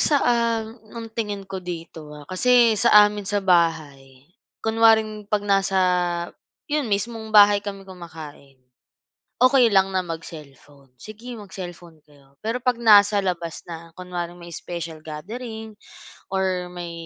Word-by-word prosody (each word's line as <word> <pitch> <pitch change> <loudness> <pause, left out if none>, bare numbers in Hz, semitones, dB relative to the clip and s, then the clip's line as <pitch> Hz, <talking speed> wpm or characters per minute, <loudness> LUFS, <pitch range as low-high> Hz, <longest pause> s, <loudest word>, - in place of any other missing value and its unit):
sa, 295 - +3
um, 230 -2 +1 0.3
ang 230 - -6
tingin 205 -3 -4
ko 190 -1 -6
dito, 165 -3 -8
ah, 145 - -12
kasi 235 +6 +3
sa 210 -1 +6
amin 205 -1 -3
sa 205 -1 0
bahay 145 -7 0 0.4
kunwaring 220 -2 +3
'pag 210 -1 0
nasa 195 -1 +2 0.9
'yon, 295 -4 -1
mismong 220 +2 -3
bahay 205 -1 +6
kami 195 -1 -7
kumakain, 160 -6 -11 0.9
okey 255 -2 +6
lang 195 0 +4
na 190 - +1
mag-cellphone. 150 -4 -10
Sige 220 +4 -9
mag-cellphone 175 -5 -10
kayo. 140 -2 -24
Pero 235 +3 -2
'pag 250 -2 +1
nasa 205 -2 +6
labas 170 -3 -3
na, 165 0 -9
kunwaring 175 -1 -6
may 170 0 -11
special 170 -2 -7
gathering 220 +8 -7 0.6
or 185 -2 -1
may 175 -1 -7
190 Hz, 135 wpm, -23 LUFS, 170-220 Hz, 0.9 s, sa